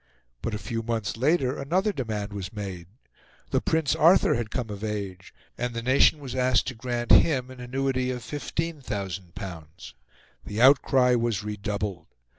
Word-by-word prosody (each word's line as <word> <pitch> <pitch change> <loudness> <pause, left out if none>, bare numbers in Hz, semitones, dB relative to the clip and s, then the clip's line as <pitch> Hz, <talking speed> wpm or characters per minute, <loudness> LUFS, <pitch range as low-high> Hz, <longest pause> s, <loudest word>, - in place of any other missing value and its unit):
But 110 - -2
a - - -2
few 115 +2 -4
months 115 -3 -2
later 135 +1 +1
another 185 +9 +1
demand 105 - -3
was 95 -2 -5
made: 95 -6 -6 0.6
the - - +2
Prince 160 -3 +1
Arthur 170 +5 +5
had 120 -2 -2
come 115 -3 -3
of 100 +1 -7
age, 100 -4 -4 0.3
and 120 0 -2
the 115 - -3
nation 130 +5 +5
was 140 -4 -7
asked 130 -1 +2
to - - -6
grant 120 0 -3
him 130 -5 +5
an 130 - -11
annuity 130 +1 -1
of 125 -1 -3
L15,000. 95 - -5 0.5
The 105 - -5
outcry 130 -1 +5
was 115 -3 0
redoubled. 105 -4 -4
120 Hz, 155 wpm, -26 LUFS, 100-130 Hz, 0.6 s, Arthur